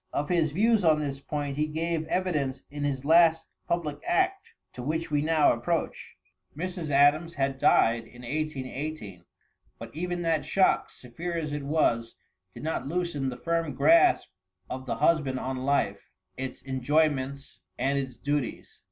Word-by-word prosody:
Of 145 - -2
his 165 -4 +2
views 215 +5 +3
on 155 -2 +4
this 140 -2 -3
point, 145 -1 -4
he 150 0 +1
gave 160 +1 -2
evidence 150 -9 -1
in 145 0 -5
his 140 -2 -2
last 165 0 +5 0.2
public 155 -4 -2
act, 385 +4 +1 0.2
to 125 - -7
which 160 +5 -2
we 145 -1 +2
now 155 -2 +4
approach. 160 +8 -3 0.4
Mrs. 175 -1 -4
Adams 145 +4 +4
had 135 -1 -1
died 115 -2 +4
in 120 +1 -14
1818, 135 - -4 0.5
but 115 +3 -10
even 175 +1 -3
that 165 -2 +1
shock, 190 -1 +2
severe 165 +8 -6
as 155 -3 -3
it 145 - -3
was, 120 -6 +1 0.4
did - - -9
not 160 -3 -2
loosen 165 -4 -1
the 125 - -6
firm 165 +1 -1
grasp 335 +2 +4 0.4
of 130 0 -5
the - - -1
husband 150 -6 +2
on 130 0 -3
life, 140 0 0 0.3
its 130 -1 -6
enjoyments 140 0 0 0.2
and 140 +1 +1
its 130 -2 -5
duties. 145 -2 -3
150 Hz, 155 wpm, -27 LUFS, 135-165 Hz, 0.5 s, last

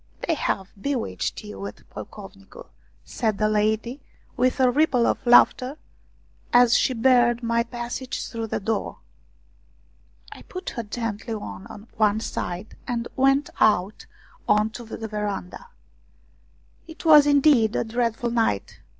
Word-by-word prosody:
" - - -8
They 330 - +2
have 195 -10 -2
bewitched 240 - -3
you 100 -1 -9
at 105 - -12
Pocovnicu! 195 - -11 0.2
" - - -36
said 220 -4 -2
the 215 - +2
lady 215 +5 0 0.3
with 255 +2 +1
a 255 -1 +4
ripple 265 -3 +2
of - - 0
laughter, 255 +3 +5 0.7
as 245 -1 +6
she 255 - +2
barred 240 0 +3
my 230 0 +1
passage 240 +2 -5
through 230 -1 -5
the - - -2
door. 220 +2 -3 1.3
I - - -11
put 370 0 -7
her 235 - -4
gently 225 0 -4
on 200 - -9
one 215 -1 +3
side 185 -2 -5
and 235 -2 -3
went 270 +2 +2
out 205 -1 +2 0.4
on 210 +1 +3
to 240 +2 -9
the 225 0 -6
veranda. 210 - -5 1.2
It 325 +1 -12
was 300 -2 +8
indeed 280 -6 +4
a - - +1
dreadful 235 0 -1
night. 225 - -1
230 Hz, 140 wpm, -24 LUFS, 210-255 Hz, 1.3 s, was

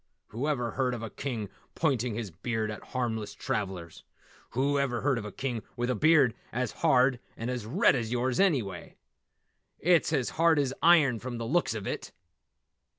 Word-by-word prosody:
Whoever 125 0 -1
heard 130 -2 0
of 115 - -7
a 110 - -5
King 120 -7 -4 0.3
pointing 125 -7 0
his 110 -4 -4
beard 110 +5 -2
at 105 - -7
harmless 110 -5 -3
travellers! 95 -7 -4 0.5
Whoever 140 -3 +1
heard 135 -4 +1
of 105 - -7
a 105 - -6
King 125 0 -3
with 120 0 -1
a - - 0
beard 145 -2 +5 0.2
as 125 -1 -1
hard 130 -5 +3 0.2
and 120 0 -3 0.2
red - - +6
as 115 -3 -2
yours, 125 +1 0
anyway! 125 - 0 0.8
It's 165 -7 +2
hard 165 0 +3
as 135 -2 +1
iron 155 -8 +5
from 120 0 -5
the 115 - -4
looks 145 -2 +1
of 105 -3 -5
it." - - -5
125 Hz, 160 wpm, -29 LUFS, 110-140 Hz, 0.8 s, red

